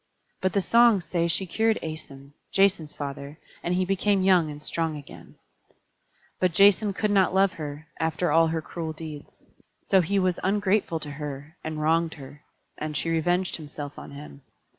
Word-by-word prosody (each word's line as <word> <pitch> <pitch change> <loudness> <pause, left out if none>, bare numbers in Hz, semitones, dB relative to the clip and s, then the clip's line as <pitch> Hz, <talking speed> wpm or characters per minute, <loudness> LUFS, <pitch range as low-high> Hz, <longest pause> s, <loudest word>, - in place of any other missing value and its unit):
But 185 -1 0
the 200 - +1
songs 230 -3 +5
say 170 +1 0
she 170 +3 0
cured 220 +5 +1
Æson, 140 -3 -8 0.2
Jason's 195 -6 +2
father, 140 +1 -6 0.2
and 175 +1 -1
he 185 0 +1
became 195 +1 +1
young 180 -4 +4
and 145 0 -7
strong 160 0 -2
again. 145 - -12 1.0
But 180 -2 +2
Jason 200 +3 +5
could 210 +2 -1
not 190 -2 +3
love 195 -1 +4
her, 150 -3 -7
after 160 +2 0
all 165 0 +5
her 160 0 -2
cruel 160 -1 -5
deeds. 155 -2 -8 0.5
So 190 - +4
he 200 +4 0
was 185 -2 +1
ungrateful 195 -3 +1
to 150 - -6
her, 145 +1 -7
and 155 -1 -4
wronged 165 +2 +1
her: 140 +1 -12 0.4
and 155 -1 -3
she 165 - -1
revenged 175 +3 +1
herself 145 -2 -8
on - - -10
him. 140 0 -11
165 Hz, 170 wpm, -26 LUFS, 150-190 Hz, 1.0 s, songs